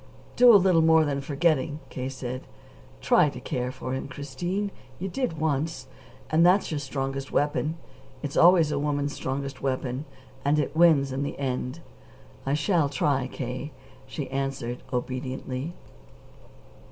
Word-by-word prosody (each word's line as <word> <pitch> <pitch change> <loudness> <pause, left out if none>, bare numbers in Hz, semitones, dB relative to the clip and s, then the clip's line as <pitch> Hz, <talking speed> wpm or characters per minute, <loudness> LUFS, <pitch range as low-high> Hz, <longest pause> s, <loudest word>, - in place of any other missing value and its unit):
"Do 245 0 +8
a 215 - +9
little 180 -3 +4
more 160 0 +5
than 140 -1 -1
forgetting," 150 +1 +1
K. 130 0 -4
said. 130 -1 -6 0.5
"Try - - +4
to - - -8
care 125 0 -3
for 130 0 -5
him, 130 - -3
Christine. 175 +9 -3 0.3
You 190 - -4
did 195 -4 -2
once. 155 +1 -1 0.5
And 160 +2 +5
that's 180 +2 +4
your 150 - -1
strongest 135 0 -4
weapon. 150 +2 0 0.5
It's 145 -1 -4
always 170 -3 +6
a 140 - 0
woman's 145 0 -1
strongest 135 0 -4
weapon. 130 +1 -2 0.4
And 145 +2 +3
it 150 0 -1
wins 155 -5 +5
in 130 +1 -2
the 145 - -3
end." 130 +2 -3 0.7
"I 140 - +2
shall 160 -1 +2
try, 140 -1 +1
K.," 130 +3 -5 0.3
she 140 +1 -5
answered 135 -3 -3
obediently. 130 +4 -3
145 Hz, 145 wpm, -26 LUFS, 130-160 Hz, 0.7 s, a